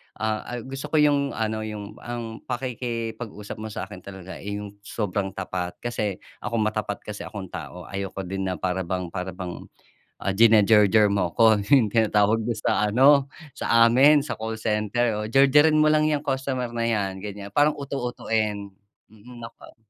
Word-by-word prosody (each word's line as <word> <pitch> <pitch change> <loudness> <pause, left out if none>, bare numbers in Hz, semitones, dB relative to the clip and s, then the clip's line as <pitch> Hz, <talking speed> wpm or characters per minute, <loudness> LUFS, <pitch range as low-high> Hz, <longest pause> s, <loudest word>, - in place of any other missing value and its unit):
Ah, 110 0 -2
al 120 -2 -5
gusto 135 +2 -6
ko 155 - -3
yung 145 -2 +3
ano, 110 -1 -1
yung 105 -1 -7
ang, 120 -2 -6
pakikipag-usap 115 -4 -5
mo 110 - -5
sa'kin 105 -2 -7
talaga, 95 -1 -10
eh, 100 0 -5
yung 105 0 -8
sobrang 100 -2 -3
tapat, 90 -1 -4
kasi 105 -5 -2 0.2
ako 115 - -4
matapat 110 -2 -1
kasi 105 -1 -7
akong 100 -4 -8
tao 90 0 -7
ayoko 95 +1 -5
din 95 +1 -3
na 90 - -1
para 90 0 -2
bang 90 -2 -3
para 90 0 -5
bang, 90 -2 -7 0.5
ah, - - -3
jinajerjer 105 -1 +6
mo 95 -4 0
ko 110 +1 +5 0.2
yung 125 -7 +6
tinatawag 110 0 +2
mo 120 - 0
sa 105 -1 0
ano 140 +2 +5 0.2
sa 115 0 +4
amin 140 +5 +6
sa 150 - -4
call 110 0 -5
center. 110 +1 0
Oo, 105 - -3
"Jerjerin 150 +4 +5
mo 155 - +5
lang 155 0 +3
'yang 150 -2 +1
customer 135 -3 -2
na 115 - 0
'yan." 100 -4 -1
gan'yan, 100 -1 -6
parang 145 +8 +3
uto-utoin. 115 -7 -2 0.4
Mm, 120 +3 -14
nako. 115 0 -12
110 Hz, 170 wpm, -24 LUFS, 100-125 Hz, 0.5 s, jinajerjer